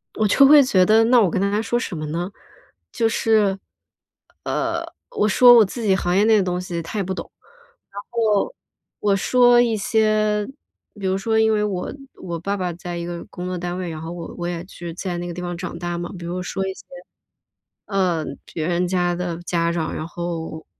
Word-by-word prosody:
我 215 - +2
就 275 +7 +6
会 290 0 +8
觉 190 -8 +3
得 220 +4 +5
那 245 0 +5
我 190 - +3
跟 185 - -1
他 200 +1 +1
还 210 +2 +1
说 240 - -1
什 235 -6 -4
么 155 -1 -4
呢？ 175 +5 -3 0.6
就 230 - +1
是， 215 -3 +2 0.8
呃， - - -1 0.3
我 430 - +1
说 245 +4 +7
我 230 - +8
自 225 +4 -5
己 195 -3 +3
行 180 0 0
业 205 - +4
内 220 -1 +5
的 195 - +3
东 180 -1 -2
西 175 -2 -4
他 190 - -6
也 200 - 0
不 190 +1 -3
懂。 - - -7 0.6
然 200 +1 -7
后， 225 - +1 0.4
我 205 -1 +2
说 245 +4 +5
一 230 -3 +1
些 215 0 +1 0.5
比 195 - -5
如 190 +1 +1
说 220 +3 +1
因 220 0 +3
为 210 - +1
我 195 -4 -2 0.3
我 170 -2 -5
爸 200 +4 -2
爸 180 -2 -2
在 175 +1 -6
一 170 - -4
个 175 -1 -6
工 180 +1 -6
作 185 0 -3
单 175 +1 -4
位， 180 -2 -4
然 160 - -6
后 165 - -6
我 170 -1 -7
我 175 - -3
也 175 -1 -4
去 175 -3 -8
在 180 -1 -4
那 175 - -4
个 175 - -5
地 180 - -6
方 175 -1 -4
长 175 -1 -6
大 175 -1 -3
嘛。 175 0 -5
比 170 - -8
如 180 +2 -3
说 190 +2 -3
一 190 - -3
些， - - -15 1.0
呃， 185 -5 0 0.3
别 160 0 -2
人 180 +1 +1
家 175 -1 0
的 175 -1 -3
家 170 -1 0
长， 165 -2 -2
然 155 - -4
后 165 -2 -5
185 Hz, 235 characters per minute, -22 LUFS, 175-215 Hz, 1.0 s, 会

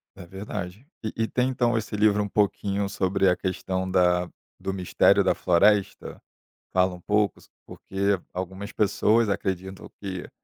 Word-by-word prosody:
É 95 - -10
verdade. 95 +3 -7 0.2
E 110 - -3
e 115 0 0
tem 125 +2 0
então 120 -2 +1
esse 110 -1 -4
livro 105 0 +3
um - - -3
pouquinho 100 -1 0
sobre 95 0 +1
a 90 - +3
questão 95 0 -3
da 90 -1 +2 0.3
do 95 - -3
mistério 90 -2 +3
da - - +3
floresta, 100 +3 +1 0.5
fala 90 0 +3
um - - -12
pouco 105 +2 +1
s - - -20 0.2
porque 100 0 -1
algumas 95 +3 -5
pessoas 105 +2 +2
acreditam 95 -1 -3
que 95 -3 -6
100 Hz, 155 wpm, -25 LUFS, 95-105 Hz, 0.5 s, livro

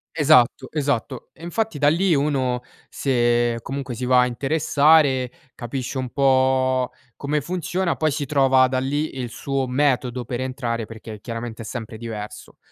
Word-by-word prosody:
Esatto, 135 -4 +4
esatto. 140 -4 -2
E - - -19
infatti 195 -1 -2
da 145 - +3
lì 170 +4 +3
uno, 135 -4 0 0.3
se 120 -2 +1
comunque 135 -2 -5
si 125 +2 -4
va 125 0 +5
a 125 - +5
interessare, 140 0 +3 0.2
capisce 125 +2 -5
un 130 -2 -3
po' 130 -1 +2 0.2
come 145 +1 -1
funziona, 180 +2 -2
poi 155 -1 +1
si 145 0 -3
trova 135 -2 +4
da 130 0 -1
lì 140 +3 -2
il 125 -2 -4
suo 135 +2 -2
metodo 130 -2 0
per 120 +1 -4
entrare, 125 -3 -3
perché 110 -1 -10
chiaramente 115 0 -6
è - - -10
sempre 115 -1 -6
diverso. 110 -2 -8
130 Hz, 155 wpm, -22 LUFS, 120-145 Hz, 0.3 s, va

